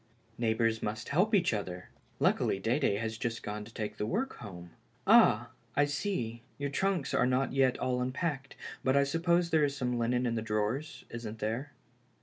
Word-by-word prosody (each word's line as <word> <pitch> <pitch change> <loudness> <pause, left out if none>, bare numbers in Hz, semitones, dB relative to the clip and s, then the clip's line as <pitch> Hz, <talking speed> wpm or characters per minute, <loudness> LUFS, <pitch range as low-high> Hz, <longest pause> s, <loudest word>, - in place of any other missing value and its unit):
" 115 0 -34
Neighbors 110 0 +2
must 110 +1 -3
help 190 +9 +3
each 175 -10 +3
other. 90 -4 -4 0.3
Luckily - - +2
Dede 115 +1 +1
has 110 0 -3
just 115 -3 -3
gone 105 0 -4
to 115 - -13
take 110 -2 -4
the 105 - -1
work 265 - -1
home. 90 -6 -9 0.3
Ah, 120 +2 +6 0.3
I 145 - +4
see, 140 - -2 0.2
your 140 -1 -3
trunks 190 -2 0
are - - +3
not 130 +1 +1
yet 135 -2 +3
all 125 -1 0
unpacked, 135 +1 -2 0.3
but 130 +1 +3
I 140 - +5
suppose 170 +4 +1
there 160 -2 +4
is 140 -1 0
some 125 -2 -1
linen 125 +2 +1
in 120 - 0
the 115 - -1
drawers 115 +8 -2
— - - -35
isn't 115 -2 -6
there 115 +7 -3
125 Hz, 190 wpm, -31 LUFS, 110-145 Hz, 0.3 s, Ah